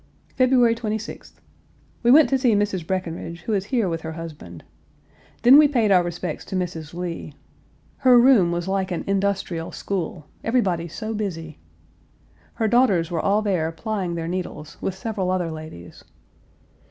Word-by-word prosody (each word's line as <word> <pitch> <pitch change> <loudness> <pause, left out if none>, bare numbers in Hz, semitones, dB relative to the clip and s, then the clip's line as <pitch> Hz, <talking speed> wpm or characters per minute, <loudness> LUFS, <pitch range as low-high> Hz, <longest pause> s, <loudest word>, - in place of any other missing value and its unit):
February 255 -2 +4
26th. 220 -1 -5 0.7
We 240 - +2
went 295 +4 +7
to 270 - +3
see 245 -4 +3
Mrs. 200 -5 -1
Breckinridge, 170 -2 -4
who 220 - -3
is 195 -2 0
here 230 -3 0
with 165 -2 -3
her 160 0 -6
husband. 150 - -9 0.8
Then 260 +4 +9
we 300 - +7
paid 235 -7 +1
our 185 -2 +6
respects 175 -1 -4
to - - -6
Mrs. 170 -3 -4
Lee. 170 -4 -5 0.6
Her 255 -1 +5
room 235 -9 +5
was 175 +1 -3
like 190 -1 -1
an 175 - -3
industrial 195 -4 -1
school: 180 -5 -4 0.2
everybody 190 -8 0
so 215 +7 -5
busy. 165 -7 -5 1.0
Her 220 - 0
daughters 205 -8 +3
were 165 -2 -1
all 205 +2 +2
there 175 -6 0
plying 190 -1 -3
their 165 -1 -4
needles, 175 -4 -5
with 190 - -2
several 195 -2 -3
other 180 -3 -1
ladies. 155 - -10
185 Hz, 155 wpm, -23 LUFS, 165-220 Hz, 1.0 s, Then